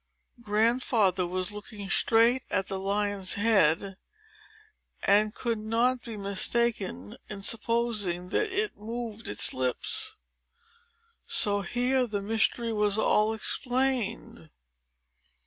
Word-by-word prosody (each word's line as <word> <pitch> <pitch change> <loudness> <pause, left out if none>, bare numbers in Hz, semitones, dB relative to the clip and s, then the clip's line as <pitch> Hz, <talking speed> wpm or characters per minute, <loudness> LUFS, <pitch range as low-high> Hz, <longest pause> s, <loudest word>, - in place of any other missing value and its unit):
Grandfather 215 -4 +1
was 185 +2 -2
looking 210 -1 -9
straight 230 +5 +3
at 195 - 0
the 195 - -3
lion's 200 0 -1
head, 195 -3 +2 1.1
and 210 +2 +2
could 230 -3 -2
not 235 +4 0
be 230 -3 -7
mistaken 200 - -1
in 200 -1 -7
supposing 215 -6 0
that 430 - -1
it 410 +2 0
moved 225 0 -7
its 105 - +5
lips. 430 - 0 1.1
So 205 -1 +2
here 250 +5 0
the 210 -2 -3
mystery 225 +2 0
was 210 -1 +1
all 215 0 +2
explained. 235 - -1
215 Hz, 105 wpm, -27 LUFS, 200-235 Hz, 1.1 s, its